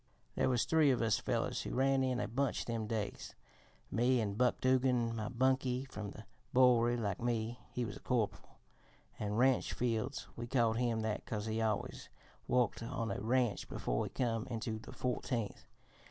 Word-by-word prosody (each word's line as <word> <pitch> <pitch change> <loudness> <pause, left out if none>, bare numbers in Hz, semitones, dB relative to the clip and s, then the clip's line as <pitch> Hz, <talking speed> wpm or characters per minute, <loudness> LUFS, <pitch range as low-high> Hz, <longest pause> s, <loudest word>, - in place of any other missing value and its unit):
"There - - +1
was 125 -2 +2
three 160 -3 +4
of 130 - +3
us 110 -3 +2
fellers - - -1
who - - -4
ran 135 +1 +3
in 130 -1 0
a - - -1
bunch 135 +5 -1
them 115 -2 -2
days: 105 -2 -4 0.6
me 120 +4 +3
an' 105 -3 -1
Buck 125 +4 +2
Dugan, 125 -3 +2
my 110 -1 -3
bunkie, 130 +1 +1
from 105 -6 -6
the 105 +2 -10 0.3
Bowery 120 -2 +5
like 100 -4 -2
me 120 0 -1
(he 125 - -2
was 100 - -6
a - - -12
corporal), 120 -5 -2 0.6
an' 105 -1 -2
Ranch 130 +2 +3
Fields 120 +2 -1
we 120 0 -5
called 115 -3 +2
him 120 -2 +1
that 110 -1 -2
'cause 105 -2 -3
he 110 0 -1
always 110 -2 -2 0.4
woiked 125 -4 +2
on 115 -1 -3
a - - -3
ranch 120 -1 +1
before - - -1
he - - -4
come 115 -2 -1
into 115 -2 -3
the - - -11
Fourteenth. 120 -4 -3
120 Hz, 180 wpm, -35 LUFS, 110-125 Hz, 0.6 s, Bowery